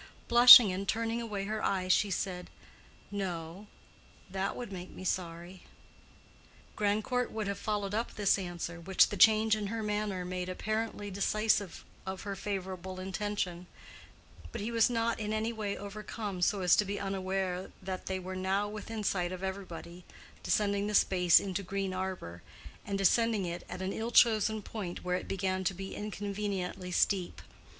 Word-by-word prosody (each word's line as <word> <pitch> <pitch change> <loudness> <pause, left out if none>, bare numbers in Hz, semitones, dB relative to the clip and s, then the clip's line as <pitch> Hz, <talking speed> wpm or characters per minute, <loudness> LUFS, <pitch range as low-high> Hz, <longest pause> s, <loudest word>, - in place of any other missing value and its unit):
Blushing 240 -3 +10
and 195 +2 -4
turning 230 +2 -1
away 205 -4 -4
her 215 +1 -3
eyes, 185 -2 +2
she 205 - +2
said, 180 -1 -3 0.6
"No, 185 -1 -5 0.6
that 195 +1 -2
would 240 -4 -6
make 185 -1 -7
me - - -10
sorry." 175 0 -4 1.1
Grandcourt 215 +4 0
would 220 -1 -3
have 200 - -3
followed 205 -2 -2
up 225 +3 -2
this 205 -1 +2
answer, 175 -2 -5
which 190 +2 +4
the - - -4
change 220 +2 +5
in 210 -1 -3
her 225 +2 -3
manner 210 -3 -2
made 180 0 -4
apparently 215 +1 -3
decisive 200 -1 0 0.2
of 190 -1 -6
her 200 -1 -4
favorable 190 -2 -5
intention; 190 -2 -3 0.8
but 235 - -5
he 215 +3 -3
was 230 0 +4
not 230 -1 0
in 215 0 -2
any 220 +2 -1
way 210 -3 -3
overcome 205 -1 -6
so 195 +2 +2
as 180 - +5
to - - +4
be 200 0 -4
unaware 190 -1 -2
that 185 -1 -6
they 190 - -1
were 185 0 -6
now, 190 +2 0
within 215 +1 -6
sight 180 -3 0
of 185 0 -6
everybody, 180 -2 -6 0.4
descending 200 +2 +1
the 210 - -1
space 180 -3 +5
into 195 -1 -3
Green 195 0 -3
Arbor, 185 - -5 0.5
and 200 -1 -1
descending 215 +1 +2
it 175 0 -5
at 185 +1 -5
an 190 - -2
ill 225 +1 -3
chosen 220 -2 +4
point 190 -6 -6
where 180 0 0
it - - -7
began 190 -1 -1
to 190 0 0
be 195 +1 -6
inconveniently 200 -3 -4
steep. 180 0 0
195 Hz, 165 wpm, -31 LUFS, 185-210 Hz, 1.1 s, Blushing